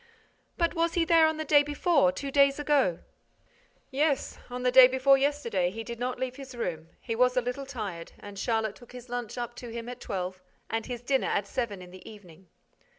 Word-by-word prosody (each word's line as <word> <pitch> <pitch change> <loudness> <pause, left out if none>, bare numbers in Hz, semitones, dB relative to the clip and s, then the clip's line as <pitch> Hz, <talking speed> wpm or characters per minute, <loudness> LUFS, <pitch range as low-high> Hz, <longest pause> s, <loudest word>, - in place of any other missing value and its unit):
"But 335 -2 +1
was 335 -1 0
he 340 -2 +2
there 330 -1 +5
on 315 0 -1
the 315 - -3
day 290 0 +6
before, 290 -1 +2
two 275 0 -5
days 275 0 +4
ago?" 285 - +1 0.9
"Yes. 285 +1 0
On 250 0 -5
the 250 - +3
day 255 0 +10
before 260 +2 +4
yesterday, 270 -10 0
he 225 +4 -6
did 235 +1 -7
not 250 +1 -2
leave 255 0 -3
his 270 -2 -9
room. 165 -8 -4
He 230 - -4
was 250 +2 +3
a - - +7
little 250 +3 -4
tired; 205 -10 -6
and 205 -1 -10
Charlotte 220 -2 0
took 245 0 -16
his 250 0 -10
lunch 245 -2 -4
up 240 -1 -4
to 240 - -8
him 230 0 -6
at 245 0 -8
twelve 185 -1 -4 0.3
and 225 0 -2
his 245 -1 -6
dinner 265 +1 +1
at 200 - 0
seven 205 -4 -3
in 180 - -13
the 185 0 -12
evening." 190 -4 -15
250 Hz, 215 wpm, -28 LUFS, 220-275 Hz, 0.9 s, day